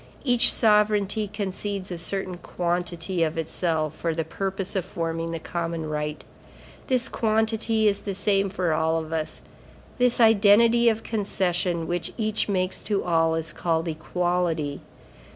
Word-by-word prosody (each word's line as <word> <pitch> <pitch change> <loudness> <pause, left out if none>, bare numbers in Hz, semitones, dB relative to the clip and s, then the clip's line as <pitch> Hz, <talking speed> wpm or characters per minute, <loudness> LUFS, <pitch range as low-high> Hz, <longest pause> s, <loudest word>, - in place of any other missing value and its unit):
Each 245 -3 +5
sovereignty 210 -1 +3
concedes 200 -1 -4
a 175 - -4
certain 185 +1 -2
quantity 175 0 -2
of 160 0 0
itself, 160 -1 -1
for 165 0 -2
the 165 - -1
purpose 195 +4 -3
of 190 - 0
forming 165 -1 -3
the 165 - -3
common 165 -1 -4
right. 150 0 -3 0.6
This 255 -3 +1
quantity 220 0 +1
is 200 -1 +1
the 200 -2 -4
same 195 0 +1
for 180 -4 -1
all 160 +1 +1
of 160 0 -5
us. 155 -1 -3 0.6
This 245 -1 +3
identity 225 +2 +5
of 220 0 -2
concession 180 -5 -1
which 175 0 -3
each 215 -2 0
makes 185 -1 -1
to 205 -2 0
all, 165 -2 +2
is 165 -1 -4
called 165 -1 -1
Equality. 165 -2 -1
180 Hz, 145 wpm, -25 LUFS, 165-210 Hz, 0.6 s, Each